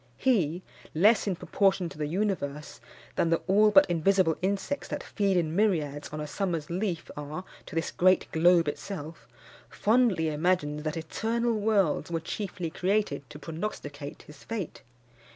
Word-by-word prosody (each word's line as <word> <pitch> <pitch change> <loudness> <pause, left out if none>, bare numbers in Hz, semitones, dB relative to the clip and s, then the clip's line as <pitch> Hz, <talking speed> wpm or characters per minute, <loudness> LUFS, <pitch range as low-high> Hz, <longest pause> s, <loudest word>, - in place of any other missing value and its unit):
He, 180 - +1 0.3
less 210 +7 +4
in 190 - +1
proportion 190 0 +1
to - - -12
the 150 - -1
universe 155 -5 -2 0.4
than 165 - +2
the 165 - +3
all 210 +3 +5
but 290 +7 +7
invisible 175 0 +2
insects 200 +9 -1
that 295 - -4
feed 200 -3 0
in 165 -2 0
myriads 155 -9 0
on 150 - -6
a 150 - -3
summer's 165 -1 -3
leaf 180 -2 -2
are 150 +4 -6 0.2
to - - -9
this 165 - -1
great 185 +1 +4
globe 170 0 +4
itself, 160 0 -6 0.4
fondly 215 -8 +2
imagines 150 -1 0
that 155 +1 -3
eternal 230 +9 -1
worlds 205 -6 +1
were 165 -1 -1
chiefly 175 0 -4
created 185 -8 -1
to 150 - -9
prognosticate 150 -4 -6
his 150 -1 -15
fate. 215 -7 -5
175 Hz, 150 wpm, -28 LUFS, 155-200 Hz, 0.4 s, but